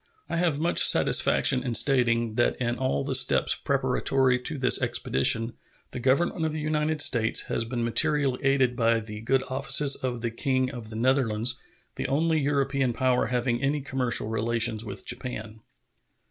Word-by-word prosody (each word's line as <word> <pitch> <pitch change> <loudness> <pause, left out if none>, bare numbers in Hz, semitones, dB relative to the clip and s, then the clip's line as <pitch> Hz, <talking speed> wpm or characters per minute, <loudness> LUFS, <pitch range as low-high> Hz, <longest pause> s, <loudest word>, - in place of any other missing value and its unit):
I 170 - -2
have 165 -4 0
much 170 +2 +2
satisfaction 130 -2 +4
in 125 -3 -2
stating 120 -4 +2
that 120 +2 0
in 120 -1 -3
all 130 - -1
the - - -3
steps - - +3
preparatory 130 -2 0
to 145 +5 -5
this 130 -2 +2
expedition 115 - 0 0.4
the - - -6
Government 150 +7 0
of 160 - -1
the 155 - -5
United 155 0 -1
States 115 -5 +3
has 115 - -1
been 120 0 -4
materially 135 +2 0
aided 135 -2 +1
by 115 -1 +1
the 105 -1 -9
good 130 +3 0
offices 135 +2 +2
of 125 -2 -5
the 120 -1 -2
King 130 +1 -1
of 120 -4 -9
the 110 - -10
Netherlands, 120 -2 0 0.4
the - - -3
only 160 +3 0
European 140 -3 -1
power 125 +1 0
having 125 -1 -2
any 140 +2 -1
commercial 130 -5 -1
relations 115 0 0
with 100 -3 -8
Japan. 110 -3 -5
125 Hz, 165 wpm, -25 LUFS, 115-140 Hz, 0.4 s, satisfaction